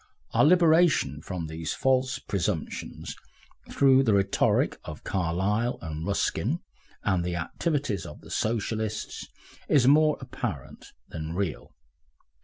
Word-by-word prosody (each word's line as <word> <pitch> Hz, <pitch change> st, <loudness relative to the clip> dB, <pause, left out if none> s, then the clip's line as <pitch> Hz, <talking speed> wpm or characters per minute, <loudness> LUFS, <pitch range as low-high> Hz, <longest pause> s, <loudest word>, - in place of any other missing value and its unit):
Our -, -, +4 dB
liberation 160 Hz, -, +4 dB
from 90 Hz, -1 st, -5 dB
these 80 Hz, 0 st, -4 dB
false 130 Hz, -1 st, +1 dB
presumptions 95 Hz, -, -3 dB, 0.5 s
through 135 Hz, -1 st, +5 dB
the 110 Hz, -6 st, +3 dB
rhetoric 100 Hz, 0 st, +2 dB
of 75 Hz, -, -8 dB
Carlyle 95 Hz, +6 st, 0 dB
and 80 Hz, 0 st, -5 dB
Ruskin 100 Hz, -, 0 dB, 0.4 s
and 90 Hz, -2 st, +1 dB
the 90 Hz, 0 st, -2 dB
activities 120 Hz, -, -2 dB
of 75 Hz, -, -11 dB
the -, -, -13 dB
Socialists, 110 Hz, -1 st, -2 dB, 0.4 s
is 130 Hz, -4 st, +4 dB
more 150 Hz, +2 st, +5 dB
apparent -, -, -6 dB, 0.2 s
than 80 Hz, +1 st, -5 dB
real. 95 Hz, -5 st, -3 dB
100 Hz, 115 wpm, -27 LUFS, 85-135 Hz, 0.5 s, through